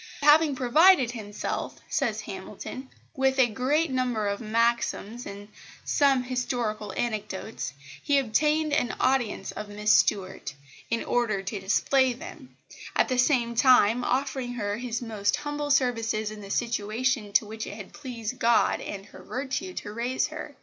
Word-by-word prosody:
"Having 295 0 +6
provided 265 +2 +5
himself," 210 -4 -5
says - - -1
Hamilton, 260 +1 -8 0.3
"with 265 -1 +2
a 260 - +6
great 265 +7 0
number 250 -5 0
of 200 +2 -2
maxims 235 0 0
and 200 +1 -8 0.4
some 275 -3 +3
historical 245 -4 -2
anecdotes, 215 -7 -3 0.3
he 285 - +2
obtained 300 +5 +2
an 245 -5 +1
audience 245 -7 +1
of 210 -1 -7
Miss 210 +1 +1
Stuart, 190 -10 +1 0.3
in 230 - 0
order 215 -5 0
to 195 +2 -4
display 255 +7 +2
them; 285 0 -11 0.4
at - - +3
the 255 -1 0
same 245 -3 +2
time 245 -1 +5
offering 260 -1 -1
her 205 -3 -2
his 240 0 -3
most 210 -3 0
humble 295 0 -4
services 230 -6 +1
in 215 -1 -9
the 200 - -10
situation 230 +1 -1
to 215 - +4
which 220 +1 -6
it 205 - -7
had 210 -3 -10
pleased 250 -4 -6
God 235 0 +3
and 195 -1 -6
her - - -14
virtue 275 +8 -4
to 210 - -6
raise 240 +3 0
her. - - -8
240 Hz, 150 wpm, -27 LUFS, 215-265 Hz, 0.4 s, Having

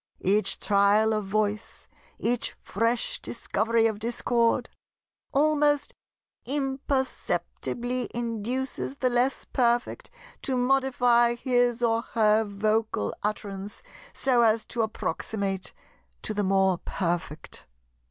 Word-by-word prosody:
Each 205 +3 +2
trial 205 +2 +3
of 215 -2 -1
voice, 210 +1 -2 0.3
each 240 0 -1
fresh 235 - -1
discovery 225 +1 0
of 220 -2 0
discord, 235 +1 +1 0.6
almost 295 0 +2 0.5
imperceptibly 265 -2 -2
induces 240 +4 -3
the 255 -2 +1
less 245 +3 +1
perfect 240 -1 0 0.3
to 260 -2 -1
modify 245 -2 +3
his 245 -1 +1
or 230 -1 +2 0.2
her 215 0 +4
vocal 215 - -1
utterance 205 -1 -4 0.3
so 255 -3 +2
as 225 -1 +3
to 235 - -2
approximate 200 -3 -3 0.5
to 215 - -3
the 205 0 0
more 190 -1 +2
perfect. 170 -4 -4
230 Hz, 100 wpm, -27 LUFS, 210-250 Hz, 0.6 s, her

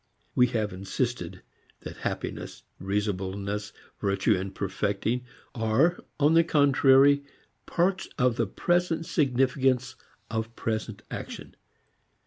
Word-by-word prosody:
We 125 - +5
have 110 -4 -1
insisted 95 0 -3 0.4
that - - -8
happiness, - - -5 0.2
reasonableness, 100 +1 -2 0.3
virtue, 100 -1 +1
perfecting, 100 +5 -2 0.3
are 120 +10 +2 0.2
on 150 +2 +4
the 165 0 +6
contrary 140 -2 +5 0.4
parts 185 +2 0
of 125 -2 +3
the 115 -2 0
present 175 - 0
significance 130 -3 +1 0.3
of 110 +1 -3
present 110 -1 -3
action. - - -7
120 Hz, 100 wpm, -27 LUFS, 100-140 Hz, 0.4 s, the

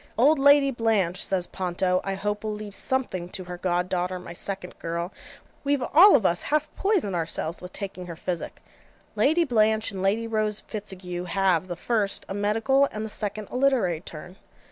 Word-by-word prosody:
'Old 280 +6 +5
Lady 285 0 +6
Blanche,' 215 -7 +1
says 185 -2 0
Ponto, 180 0 -1
'I 195 0 -2
hope 205 +2 -3
will 215 - -2
leave 210 -1 -8
something 200 -9 -1
to 185 0 -5
her 180 0 -8
god 180 0 0
daughter 180 0 -1
my 180 -1 -9
second 190 0 -5
girl 170 +2 -3 0.5
we've 280 -2 +1
all 365 +5 +9
of 225 -8 +2
us 175 0 +2
half 305 0 -1
poisoned 385 - +1
ourselves 165 -1 -2
with 180 +1 -8
taking 185 -3 -6
her 170 - -6
physic.' 175 +1 -5 0.5
Lady 320 +5 +3
Blanche 220 -5 +2
and 190 -1 -5
Lady 205 +4 +1
Rose 215 -2 0
Fitzague 185 -4 -6
have, 185 -1 +1
the 175 - -4
first, 210 0 0
a - - -4
medical, 225 +7 +2
and 215 +1 -4
the - - -6
second 210 0 -4
a - - -6
literary 250 -12 +2
turn. 180 +2 -10
200 Hz, 185 wpm, -26 LUFS, 180-230 Hz, 0.5 s, all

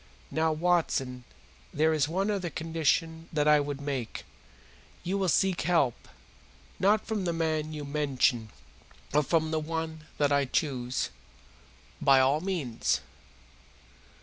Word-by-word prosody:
Now, 160 0 +1
Watson, 155 -7 0 0.5
there 160 +2 +2
is 150 -3 +2
one 190 +6 0
other 190 -4 -2
condition 165 0 -1
that 150 -2 +1
I 150 0 +6
would 145 -1 -3
make. 135 -5 -4 0.8
You 185 +3 -1
will 190 -2 +1
seek 185 +4 +2
help, 160 -8 +1 0.7
not 210 +3 +3
from 215 -4 -2
the 170 - +1
man 155 -2 -1
you 150 -2 -5
mention, 135 -6 +1 0.6
but 150 0 +2
from 160 -2 +1
the 160 - +1
one 160 0 -4
that 145 -1 +2
I 140 -1 +3
choose." 130 - -1 0.9
"By 135 -1 +6
all 135 +4 +3
means." 165 -11 -1
155 Hz, 130 wpm, -29 LUFS, 140-165 Hz, 0.9 s, I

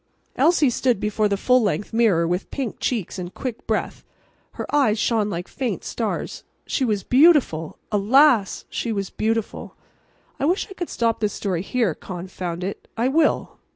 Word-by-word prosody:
Elsie 315 -6 +4
stood 245 -3 +1
before 210 0 0
the 200 - 0
full 250 +5 +3
length 205 0 -1
mirror 205 -8 +3
with 180 +3 -2
pink 265 -6 -4
cheeks 210 -6 -2
and 180 0 -7
quick 250 -4 -6
breath. - - -2 0.5
Her - - -5
eyes 255 -7 +3
shone 215 -1 +1
like 175 -2 -4
faint 255 -3 -3
stars. - - -3 0.2
She 270 - -1
was 210 -6 0
beautiful. 255 - +4
Alas! 220 +1 +4
she 235 - -3
was 200 -3 -3
beautiful. 225 0 -2 0.6
I 275 - 0
wish 355 +6 +1
I 390 - -10
could 350 -3 -5
stop 230 -1 0
this 210 -2 0
story 185 -5 -2
here. 220 -2 0
Confound 180 0 -6
it! 195 +2 -5
I 240 +3 +2
will. 310 +3 +1
220 Hz, 165 wpm, -23 LUFS, 195-255 Hz, 0.6 s, Elsie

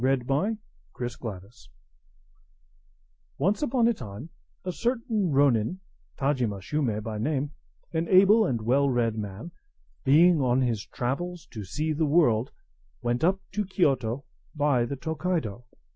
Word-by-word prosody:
TAJIMA, 130 -1 +1
By 185 - 0 0.4
Miss 120 -1 -4
Mitford 100 -3 -6 1.9
Once 200 - +1
upon 250 -5 +2
a 235 - +3
time, 120 - -9 0.3
a 185 - -1
certain 230 -3 -1
ronin, 140 - +2 0.4
Tajima 130 -8 0
Shume 110 -1 -1
by 110 -1 -4
name, 145 +3 -1 0.4
an 165 +1 0
able 200 +4 +6
and 120 - -1
well 135 +5 +3
read 120 -3 +1
man, 105 - -6 0.5
being 160 +3 +5
on 125 0 +2
his 115 -5 -1
travels 165 +7 -3
to 110 -3 -6
see 155 - -2
the 155 +1 +1
world, 135 -7 +3 0.5
went 120 +4 0
up 190 +3 +2
to 210 +1 -1
Kiyoto 140 - 0 0.3
by 145 -5 +2
the 140 - -4
Tokaido. 155 - -3
140 Hz, 135 wpm, -27 LUFS, 120-175 Hz, 1.9 s, able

